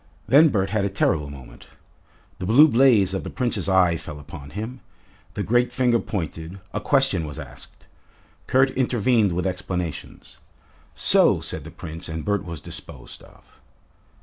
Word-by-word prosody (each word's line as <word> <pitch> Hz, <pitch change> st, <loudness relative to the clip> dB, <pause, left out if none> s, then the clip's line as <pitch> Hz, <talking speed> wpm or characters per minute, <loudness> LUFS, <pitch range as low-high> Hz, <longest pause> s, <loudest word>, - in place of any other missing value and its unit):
Then 145 Hz, +8 st, +6 dB
Bert 95 Hz, -5 st, -1 dB
had 110 Hz, -2 st, 0 dB
a 100 Hz, -, 0 dB
terrible 75 Hz, -6 st, 0 dB
moment. 65 Hz, -3 st, -12 dB, 0.7 s
The 90 Hz, -, -4 dB
blue 135 Hz, +9 st, +7 dB
blaze 115 Hz, -8 st, +4 dB
of 95 Hz, -, -3 dB
the -, -, -6 dB
Prince's 115 Hz, -7 st, -2 dB
eye 90 Hz, -3 st, +3 dB
fell 75 Hz, -2 st, -9 dB
upon 70 Hz, -1 st, -10 dB
him, 110 Hz, -, -6 dB, 0.6 s
the -, -, -2 dB
great 120 Hz, +3 st, +1 dB
finger 120 Hz, -2 st, +2 dB
pointed, 85 Hz, -2 st, -5 dB
a -, -, -3 dB
question 135 Hz, -, +2 dB
was 75 Hz, -2 st, -7 dB
asked. -, -, -12 dB, 0.6 s
Kurt 130 Hz, +1 st, +3 dB
intervened 120 Hz, -5 st, +1 dB
with 90 Hz, +2 st, -2 dB
explanations. 90 Hz, -3 st, -5 dB, 0.6 s
"So," -, -, +4 dB
said -, -, -4 dB
the -, -, -8 dB
Prince, 80 Hz, +1 st, -9 dB
and 80 Hz, -1 st, -5 dB
Bert 105 Hz, -1 st, 0 dB
was 85 Hz, -4 st, -7 dB
disposed 60 Hz, -, -10 dB
of. -, -, -19 dB
95 Hz, 155 wpm, -23 LUFS, 85-120 Hz, 0.7 s, blue